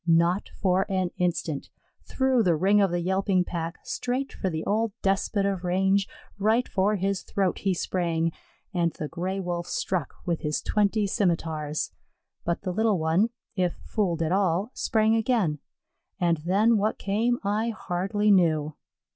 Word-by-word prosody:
Not 170 Hz, +3 st, +3 dB
for 190 Hz, 0 st, +2 dB
an 185 Hz, -2 st, 0 dB
instant; 170 Hz, -4 st, -1 dB, 0.4 s
through 260 Hz, -2 st, +2 dB
the 175 Hz, -6 st, +3 dB
ring 200 Hz, +6 st, +4 dB
of 195 Hz, -, +3 dB
the 175 Hz, 0 st, -1 dB
yelping 190 Hz, +1 st, +1 dB
pack, 170 Hz, -1 st, -4 dB
straight 255 Hz, +2 st, -3 dB
for 190 Hz, -, -2 dB
the 160 Hz, -2 st, -4 dB
old 220 Hz, +1 st, 0 dB
despot 195 Hz, +1 st, +1 dB
of 195 Hz, -2 st, -1 dB
range, 190 Hz, +2 st, +2 dB, 0.3 s
right 220 Hz, +5 st, +2 dB
for 200 Hz, +2 st, +1 dB
his 195 Hz, 0 st, -1 dB
throat 195 Hz, -3 st, -1 dB
he 195 Hz, -2 st, 0 dB
sprang; 165 Hz, -2 st, 0 dB, 0.4 s
and 170 Hz, -2 st, +1 dB
the 150 Hz, -, -5 dB
Gray 185 Hz, +5 st, -3 dB
wolf 175 Hz, -2 st, -3 dB
struck 175 Hz, -7 st, -2 dB
with 170 Hz, -2 st, 0 dB
his 150 Hz, 0 st, -1 dB
twenty 210 Hz, 0 st, +1 dB
scimitars. 160 Hz, -7 st, -1 dB, 0.5 s
But 170 Hz, +2 st, -2 dB
the 185 Hz, -2 st, -2 dB
little 220 Hz, 0 st, +2 dB
one, 165 Hz, +7 st, +2 dB, 0.3 s
if 180 Hz, -3 st, 0 dB
fooled 175 Hz, -6 st, 0 dB
at 160 Hz, -, -1 dB
all, 190 Hz, +3 st, +1 dB
sprang 220 Hz, -2 st, +2 dB
again, 220 Hz, -, +1 dB, 0.6 s
and 170 Hz, -2 st, +2 dB
then 200 Hz, +8 st, +3 dB
what 215 Hz, +2 st, 0 dB
came 225 Hz, +5 st, +1 dB
I 210 Hz, +3 st, 0 dB
hardly 205 Hz, 0 st, 0 dB
knew. 155 Hz, -5 st, +3 dB
190 Hz, 155 wpm, -26 LUFS, 170-205 Hz, 0.6 s, ring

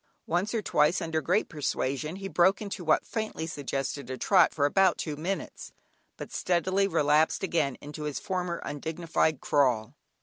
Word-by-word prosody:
Once 180 Hz, +5 st, 0 dB
or 220 Hz, -, -1 dB
twice, 150 Hz, +3 st, +3 dB
under 160 Hz, -3 st, -2 dB
great 185 Hz, +7 st, +1 dB
persuasion, 150 Hz, 0 st, -2 dB
he 195 Hz, 0 st, -6 dB
broke 190 Hz, +1 st, +3 dB
into 200 Hz, -4 st, -5 dB
what 155 Hz, -2 st, +2 dB
faintly 215 Hz, -7 st, -3 dB
suggested 140 Hz, -3 st, -4 dB
a 130 Hz, -, -4 dB
trot, 185 Hz, +2 st, +4 dB
for 145 Hz, -, +1 dB
about 190 Hz, +4 st, +3 dB
two 150 Hz, -, -3 dB
minutes, 175 Hz, +6 st, -5 dB, 0.4 s
but -, -, -8 dB
speedily 185 Hz, +2 st, +1 dB
relapsed 150 Hz, -2 st, +2 dB
again 160 Hz, -8 st, 0 dB
into 150 Hz, +1 st, -7 dB
his 145 Hz, -3 st, -3 dB
former 180 Hz, -3 st, -3 dB
undignified 160 Hz, 0 st, -1 dB
crawl. 125 Hz, -7 st, +1 dB
160 Hz, 160 wpm, -28 LUFS, 145-185 Hz, 0.4 s, trot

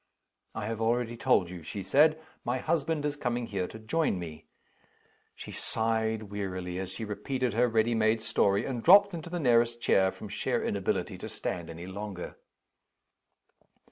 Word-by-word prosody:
"I -, -, -3 dB
have 115 Hz, +1 st, -3 dB
already 120 Hz, +1 st, +1 dB
told 115 Hz, -8 st, +2 dB
you," 90 Hz, -2 st, -7 dB
she 95 Hz, +5 st, -6 dB
said, 155 Hz, -, +4 dB, 0.2 s
"my 120 Hz, +2 st, 0 dB
husband 155 Hz, +1 st, 0 dB
is 145 Hz, -1 st, -1 dB
coming 120 Hz, -4 st, -2 dB
here 95 Hz, -5 st, -2 dB
to -, -, -9 dB
join 110 Hz, -, 0 dB
me." 80 Hz, -3 st, -8 dB, 0.9 s
She -, -, -9 dB
sighed 110 Hz, -1 st, 0 dB
wearily 95 Hz, -3 st, -4 dB
as 95 Hz, -1 st, -4 dB
she 115 Hz, -, -5 dB
repeated 120 Hz, +4 st, -2 dB
her 120 Hz, +3 st, +3 dB
ready 115 Hz, 0 st, +2 dB
made 110 Hz, 0 st, +3 dB
story 100 Hz, -3 st, +2 dB
and 125 Hz, -4 st, -3 dB
dropped 200 Hz, -, +7 dB
into 170 Hz, 0 st, -6 dB
the 175 Hz, +1 st, -3 dB
nearest 120 Hz, -4 st, +3 dB
chair, 95 Hz, -4 st, +3 dB
from 105 Hz, -, -9 dB
sheer 105 Hz, +2 st, -1 dB
inability -, -, -1 dB
to -, -, -6 dB
stand 85 Hz, -2 st, -4 dB
any 85 Hz, +1 st, -7 dB
longer. 95 Hz, -1 st, -6 dB
110 Hz, 165 wpm, -29 LUFS, 100-125 Hz, 0.9 s, dropped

